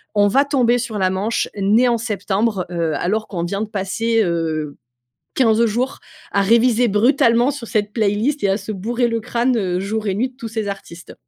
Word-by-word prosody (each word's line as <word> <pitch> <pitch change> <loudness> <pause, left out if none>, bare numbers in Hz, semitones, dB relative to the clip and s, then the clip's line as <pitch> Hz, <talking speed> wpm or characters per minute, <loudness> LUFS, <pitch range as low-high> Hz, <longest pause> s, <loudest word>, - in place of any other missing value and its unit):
on 205 0 +4
va 270 +8 +3
tomber 250 -4 +2
sur 230 -3 -4
la 190 -2 +2
manche 195 +5 -1
«Nés 210 +5 +3
en 235 - +2
septembre», 210 -2 -1
heu, 165 -2 -1
alors 215 +8 -1
qu'on 175 -4 -4
vient 195 +4 -3
de 220 - -2
passer, 225 +3 -1
heu, 160 -4 -2 0.6
15 230 -2 +3
jours 245 +5 -2 0.3
à 200 - +2
réviser 235 +3 +3
brutalement 235 +3 +3
sur 260 -4 -7
cette 210 -1 -1
playlist 220 +7 0
et 200 - +3
à 195 - +2
se 210 +1 -6
bourrer 235 +5 -1
le 230 0 -1
crâne, 245 +2 0
heu, 185 -5 -1
jour 215 +3 -3
et 190 - 0
nuit 245 +6 -1
de 255 - -28
tous 230 -4 -7
ces 220 -1 -3
artistes. 180 -3 -8
215 Hz, 200 wpm, -19 LUFS, 195-235 Hz, 0.6 s, on